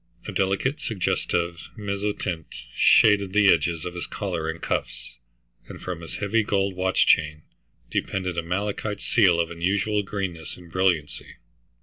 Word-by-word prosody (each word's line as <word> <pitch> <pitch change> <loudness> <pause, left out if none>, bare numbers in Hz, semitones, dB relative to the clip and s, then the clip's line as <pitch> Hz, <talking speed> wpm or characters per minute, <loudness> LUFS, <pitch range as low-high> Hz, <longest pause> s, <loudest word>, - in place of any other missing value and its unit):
A - - -3
delicate 100 +10 0
suggestive 85 - -2
mezzotint 100 -5 -3 0.3
shaded 100 -3 +5
the 105 -1 +6
edges 80 0 -1
of 90 - -4
his 90 - -5
collar 85 -5 -3
and 80 +1 -4
cuffs, - - -4 0.5
and - - -9
from 90 -2 -5
his 80 - -8
heavy 105 +3 +1
gold 100 -2 0
watch 95 +1 +2
chain 75 0 +2 0.5
depended 95 -2 -2
a 85 - 0
malachite 100 +4 -3
seal 95 -8 +3
of 85 0 0
unusual 100 +5 0
greenness 95 -5 -5
and 90 -2 -15
brilliancy. 90 -5 0
95 Hz, 140 wpm, -25 LUFS, 85-100 Hz, 0.5 s, the